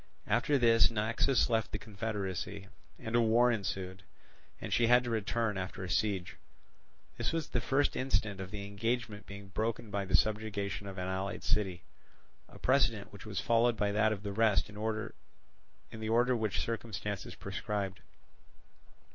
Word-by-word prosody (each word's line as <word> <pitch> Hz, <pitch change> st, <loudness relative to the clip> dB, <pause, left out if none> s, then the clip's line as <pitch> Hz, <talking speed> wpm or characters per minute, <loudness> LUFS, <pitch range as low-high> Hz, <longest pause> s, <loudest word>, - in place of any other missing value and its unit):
After 120 Hz, +6 st, +2 dB
this 115 Hz, -2 st, +5 dB
Naxos 115 Hz, +4 st, +2 dB
left 115 Hz, -2 st, 0 dB
the -, -, -2 dB
confederacy, 100 Hz, -2 st, -4 dB, 0.3 s
and 110 Hz, +1 st, -4 dB
a 120 Hz, -, +5 dB
war 120 Hz, +2 st, +5 dB
ensued, 95 Hz, -3 st, -3 dB, 0.6 s
and -, -, -4 dB
she 120 Hz, 0 st, +4 dB
had 125 Hz, +1 st, +6 dB
to 120 Hz, -, -3 dB
return 110 Hz, -1 st, 0 dB
after 95 Hz, +1 st, -5 dB
a 95 Hz, -, -5 dB
siege; 95 Hz, -1 st, 0 dB, 0.8 s
this -, -, 0 dB
was 165 Hz, -2 st, -2 dB
the 125 Hz, -, 0 dB
first 145 Hz, +3 st, +2 dB
instance 110 Hz, -7 st, 0 dB
of 95 Hz, -, -6 dB
the 100 Hz, -1 st, -5 dB
engagement 110 Hz, +1 st, -2 dB
being 100 Hz, -1 st, -9 dB
broken 110 Hz, +1 st, -2 dB
by 100 Hz, -1 st, -1 dB
the 95 Hz, -2 st, +3 dB
subjugation 105 Hz, -2 st, -1 dB
of 95 Hz, 0 st, -7 dB
an 90 Hz, 0 st, -2 dB
allied 95 Hz, +1 st, -3 dB
city, 95 Hz, -6 st, 0 dB, 0.7 s
a -, -, -13 dB
precedent 115 Hz, -6 st, +2 dB
which 100 Hz, +1 st, -10 dB
was 100 Hz, -2 st, -2 dB
followed 115 Hz, 0 st, +3 dB
by 100 Hz, 0 st, +1 dB
that 110 Hz, +1 st, +3 dB
of 105 Hz, -2 st, -3 dB
the 100 Hz, -1 st, -3 dB
rest 110 Hz, -1 st, +3 dB
in -, -, -11 dB
the 105 Hz, -, -7 dB, 1.3 s
order 120 Hz, +2 st, +4 dB
which 110 Hz, -4 st, -1 dB
circumstances 105 Hz, -3 st, -3 dB
prescribed. 100 Hz, -3 st, -3 dB
105 Hz, 160 wpm, -32 LUFS, 100-115 Hz, 1.3 s, had